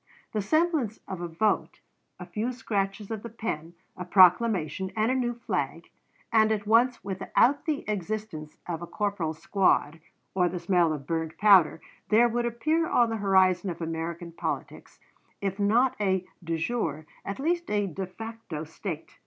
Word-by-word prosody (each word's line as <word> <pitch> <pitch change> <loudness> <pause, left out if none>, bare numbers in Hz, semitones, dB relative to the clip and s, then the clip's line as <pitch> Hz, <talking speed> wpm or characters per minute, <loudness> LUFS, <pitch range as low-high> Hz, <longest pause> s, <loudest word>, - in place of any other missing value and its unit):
The 215 - 0
semblance 300 - +1
of 190 -2 -5
a 175 - -3
vote, 170 +6 0 0.4
a - - -7
few 230 +3 -2
scratches 205 -3 -2
of 220 -2 -3
the 235 - -7
pen, 175 -8 -5 0.2
a 180 - -5
proclamation, 185 0 +4
and 220 +2 +2
a - - +1
new 240 -2 0
flag, 240 - -3 0.4
and 220 -1 +5
at 210 -1 -1
once 235 +3 +3
without 200 +8 +1
the 300 -2 -1
existence 205 -6 -4
of 170 -2 -4
a 175 - -6
corporal's 190 -7 -2
squad, 165 -3 +1 0.3
or 180 -2 +2
the 180 - -4
smell 175 -1 +2
of 145 -3 -4
burnt 160 0 -3
powder, 190 -7 +5 0.3
there 230 +3 +6
would 240 +1 0
appear 310 +8 0
on 235 -2 +3
the 225 - -1
horizon 190 -2 +3
of 170 - -5
American 165 +1 -4
politics, 165 - -5 0.4
if 195 0 -3
not 230 +6 +3
a 190 -2 +1 0.2
de 165 -1 -2
jure 160 -5 -2 0.2
at 200 - -5
least 345 +5 -1
a 205 -1 +1
de 190 +1 -4
facto 225 -5 -7
State! 160 +1 -7
200 Hz, 165 wpm, -27 LUFS, 170-225 Hz, 0.4 s, there